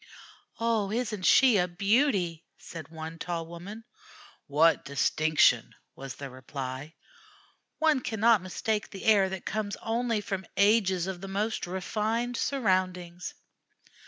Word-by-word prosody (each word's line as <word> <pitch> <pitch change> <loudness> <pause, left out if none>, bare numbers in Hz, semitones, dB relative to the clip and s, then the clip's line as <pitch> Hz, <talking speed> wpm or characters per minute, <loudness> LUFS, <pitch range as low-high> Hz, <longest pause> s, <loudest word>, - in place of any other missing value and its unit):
"Oh, 225 -3 +1
isn't 215 -5 -1
she 255 -6 +6
a 180 - +2
beauty!" 190 - +1
said 160 -2 -9
one 160 0 -8
tall 165 -1 -3
woman. 180 +7 -9 0.6
"What 155 +3 +4
distinction!" 140 -2 +2 0.2
was 135 -1 -8
the 140 -2 -8
reply. 130 +3 -7 0.8
"One 315 -3 +3
cannot 225 -3 +3
mistake 210 +3 -2
the 195 - -9
air 200 -3 +5
that 190 -1 -6
comes 210 -1 -2
only 230 0 -1
from 195 -2 -4
ages 200 -4 +3
of 190 -2 -5
the 195 - -6
most 205 +1 -2
refined 220 +6 -2
surroundings." 185 -9 -1
190 Hz, 125 wpm, -28 LUFS, 165-220 Hz, 0.8 s, she